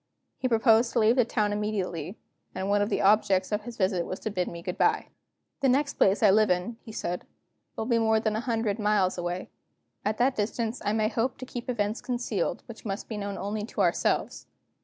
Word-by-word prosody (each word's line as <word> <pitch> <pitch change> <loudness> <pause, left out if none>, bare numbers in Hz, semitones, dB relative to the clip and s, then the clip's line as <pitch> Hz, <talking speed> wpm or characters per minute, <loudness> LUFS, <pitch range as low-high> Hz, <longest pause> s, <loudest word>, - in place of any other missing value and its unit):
He 255 - 0
proposed 230 0 +4
to 240 - +2
leave 225 +2 +4
the 250 -3 +4
town 210 -3 0
immediately; 200 -4 -3 0.4
and 190 +1 -2
one 205 0 +3
of 205 - +1
the 205 - 0
objects 195 -2 +3
of 210 0 0
his 240 -1 -8
visit 185 -3 +1
was 185 - -5
to 215 - -3
bid 180 -2 -1
me 170 0 -7
good 180 - -3
by. 435 0 +1 0.5
"The 275 -2 +3
next 280 +3 +2
place 195 +3 +3
I 205 - +7
live 215 +1 +4
in," 180 +6 0
he 225 - -9
said, 175 -4 -3 0.5
"will 220 - -3
be 235 -1 +2
more 220 -1 +3
than 215 -1 0
a - - 0
hundred 225 -3 -1
miles 205 -4 +2
away. 175 +1 -4 0.5
At 210 +1 -1
that 255 +2 +2
distance 225 +2 -2
I 205 - +1
may 215 0 +1
hope 245 +3 -1
to 255 - -7
keep 245 0 -7
events 215 -2 -1
concealed 240 -7 -2
which 230 - -11
must 200 -1 -4
be 220 - -4
known 200 -1 -4
only 210 +1 -3
to - - -3
ourselves. - - 0
215 Hz, 220 wpm, -27 LUFS, 195-230 Hz, 0.5 s, I